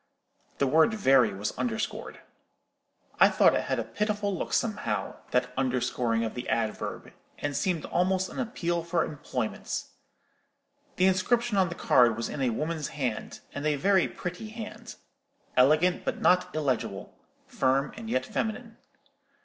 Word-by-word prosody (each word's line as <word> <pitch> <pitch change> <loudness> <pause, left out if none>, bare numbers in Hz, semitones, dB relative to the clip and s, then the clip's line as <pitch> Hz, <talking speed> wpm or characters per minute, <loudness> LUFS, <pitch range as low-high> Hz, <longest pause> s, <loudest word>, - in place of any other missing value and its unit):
The 140 - +2
word 160 - +4
'very' 135 - +4
was 100 +2 -3
underscored. 225 -2 -3 1.0
I - - +8
thought - - +5
it - - 0
had - - -1
a - - -1
pitiful 210 -2 -1
look - - -4
somehow, 160 - -1
that 125 0 0
underscoring 125 -3 0
of 110 - -3
the 125 - -5
adverb, 110 -2 -2 0.2
and 145 -1 -3
seemed 175 -2 0
almost 185 +1 +1
an - - -8
appeal 175 -9 -1
for 170 +1 0
employment. 130 -6 -4 1.1
The 185 - +3
inscription 215 +5 +2
on 190 -3 +3
the 170 - -6
card 120 -7 +4
was 115 - -3
in 140 - -4
a 130 - +2
woman's 155 +5 -2
hand, 125 -7 -4
and 145 - -5
a 150 - +2
very 190 +5 +3
pretty 180 +5 -6
hand—elegant 180 - -1
but - - -2
not 180 -2 +3
illegible, 140 -6 -2 0.3
firm 135 +2 +1
and 225 0 -7
yet 130 -7 0
feminine. 225 - -3
160 Hz, 145 wpm, -28 LUFS, 130-195 Hz, 1.1 s, I